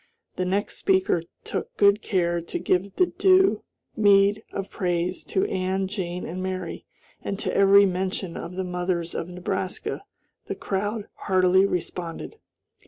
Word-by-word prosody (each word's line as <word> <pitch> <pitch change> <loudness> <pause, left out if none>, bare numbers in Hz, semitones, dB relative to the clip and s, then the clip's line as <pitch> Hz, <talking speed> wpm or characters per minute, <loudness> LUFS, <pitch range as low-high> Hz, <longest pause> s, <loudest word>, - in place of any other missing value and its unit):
The 185 - -1
next 195 +3 -1
speaker 190 -3 +2 0.2
took - - -5
good 200 +1 +5
care 175 -5 0
to 170 - -5
give 190 +2 0
the 365 - +4
due 380 +1 +4 0.3
meed 205 0 +4
of 195 0 -5
praise 175 -1 -1
to 190 - 0
Ann, 190 +1 -1
Jane, 180 -3 -4
and 180 +3 -5
Mary, 185 0 -4 0.3
and 195 - -3
to - - -3
every 200 0 +7
mention 185 -1 -2
of 170 +2 -6
the 190 - -2
mothers 180 -1 -2
of 165 - -4
Nebraska 180 +1 -3 0.5
the - - -3
crowd 205 +2 -3
heartily 185 0 +3
responded. 175 - -4
190 Hz, 145 wpm, -25 LUFS, 180-200 Hz, 0.5 s, every